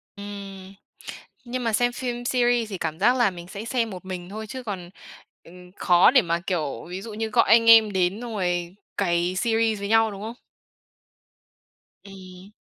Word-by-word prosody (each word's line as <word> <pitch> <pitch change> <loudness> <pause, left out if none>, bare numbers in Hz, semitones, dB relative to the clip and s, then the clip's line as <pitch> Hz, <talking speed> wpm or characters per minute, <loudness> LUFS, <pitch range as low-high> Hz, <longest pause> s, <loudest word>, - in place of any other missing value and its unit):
Ừm, 200 -1 -9 0.7
nhưng 245 0 -4
mà 230 - 0
xem 245 +2 +2
phim 245 -1 -4
series 240 -3 +1
thì 190 - -5
cảm 160 0 -4
giác 245 +6 +3
là 240 -5 +3
mình 175 -1 -10
sẽ 205 +3 -7
xem 230 -2 -1
một 185 0 -9
mình 180 -1 -7
thôi, 215 +2 -7
chứ 260 +3 -7
còn, 185 -6 -6 0.5
ừm, 180 +1 -15
khó 180 +4 +5
để 255 -3 +5
mà, 170 0 -1
kiểu, 160 -7 -3
ví 185 +2 -6
dụ 225 -1 -8
như 220 +1 -3
gọi - - +2
anh 230 0 +6
em 220 -2 +7
đến 190 +3 0
xong 240 -2 -6
rồi 175 -1 -2 0.2
cày 175 +1 0
series 225 0 +1
với 200 0 -5
nhau, 225 0 +4
đúng 200 0 -9
không? 225 +2 -6 1.7
Ừm. 190 -1 -13
200 Hz, 185 wpm, -24 LUFS, 180-230 Hz, 1.7 s, em